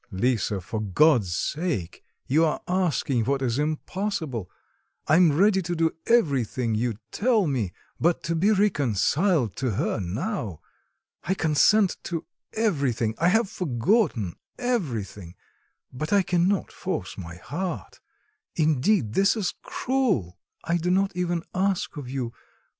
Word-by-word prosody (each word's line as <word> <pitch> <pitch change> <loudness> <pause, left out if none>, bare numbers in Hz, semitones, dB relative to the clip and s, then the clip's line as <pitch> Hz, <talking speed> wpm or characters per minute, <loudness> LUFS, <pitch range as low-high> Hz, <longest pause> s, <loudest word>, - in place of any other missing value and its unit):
"Lisa, 110 -1 0
for 110 +4 -4
God's 110 - +3
sake, 150 - -2 0.2
you 155 +5 +3
are 155 -2 0
asking 160 -9 +1
what 135 0 0
is 125 +1 0
impossible. 155 - -2 0.6
I 155 - +5
am 170 -2 +6
ready 190 +6 +3
to 175 0 -3
do 165 -1 +2 0.2
everything 130 - +2
you 115 +1 0 0.2
tell 225 -3 +2
me; 125 - -1 0.3
but 170 +2 +1
to 165 - -1
be 185 +6 +3
reconciled 150 - +2
to 130 -5 -1
her 110 - -1
now!... 95 -1 -3 0.7
I 190 +4 +1
consent 185 +6 +3
to 165 -3 -3 0.3
everything, 140 - 0
I 170 - +3
have 220 +4 +3
forgotten 135 - 0 0.2
everything; 115 - -3 0.6
but 155 +5 -4
I 200 -1 +4
cannot 180 +2 +1
force - - -4
my 85 -2 -8
heart.... 170 - -5 0.6
Indeed, 150 - +2
this 195 - +3
is 200 -4 -1
cruel!" 200 - -1 0.2
"I 170 0 +1
do 175 +1 -1
not 195 +1 +1
even 175 -2 -1
ask 190 -1 0
of 140 -5 -7
you... 125 -3 -3
155 Hz, 135 wpm, -25 LUFS, 115-190 Hz, 0.7 s, am